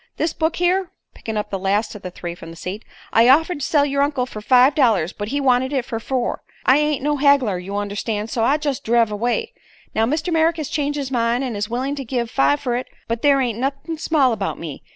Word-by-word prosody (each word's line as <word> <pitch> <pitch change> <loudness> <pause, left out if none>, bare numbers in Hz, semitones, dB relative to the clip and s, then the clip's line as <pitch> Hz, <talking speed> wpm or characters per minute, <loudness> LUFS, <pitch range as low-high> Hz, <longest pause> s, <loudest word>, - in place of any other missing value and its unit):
This 320 - 0
book 320 0 -1
here," 360 +1 +1 0.2
picking 220 -1 -5
up 210 0 -3
the 195 - -2
last 200 +3 0
of 210 - -10
the 185 - -6
three 175 -1 -6
from 165 -1 -11
the 165 - -10
seat, 185 +6 -6 0.3
"I 230 +2 +6
offered 320 +4 +4
to 275 - -2
sell 290 -2 +3
yer 280 0 0
uncle 280 -3 +1
fer 215 -4 -8
five 255 +5 +5
dollars; 220 - +2
but 205 - -5
he 280 +6 -1
wanted 260 -1 +2
it 265 -4 -1
fer 230 -4 -4
four. 250 +1 -2 0.2
I 265 +3 +5
ain't 300 -3 0
no 295 0 +1
haggler, 270 -9 +3
you 195 +3 -6
understan', 205 +1 -3
so 225 0 -1
I 280 +6 +3
jest 290 -3 -3
driv 230 -1 +2
away. 240 - -1 0.4
Now 225 +1 +2
Mr. 315 +6 -1
Merrick 325 +1 +2
has 305 -3 -4
changed 290 -1 -1
his 275 -2 -4
mind 235 +1 +1
an' 250 -4 -3
is 205 +1 -3
willin' 255 +4 -2
to 275 - -4
give 240 -1 -3
five 280 +2 +2
fer 245 -3 -1
it; 255 - -5 0.2
but 230 0 -2
there 280 -2 +4
ain't 235 -3 -1
nuthin' 275 +5 -3
small 285 -7 +2
about 205 -3 -3
me. 155 -4 -7
255 Hz, 245 wpm, -21 LUFS, 220-285 Hz, 0.4 s, I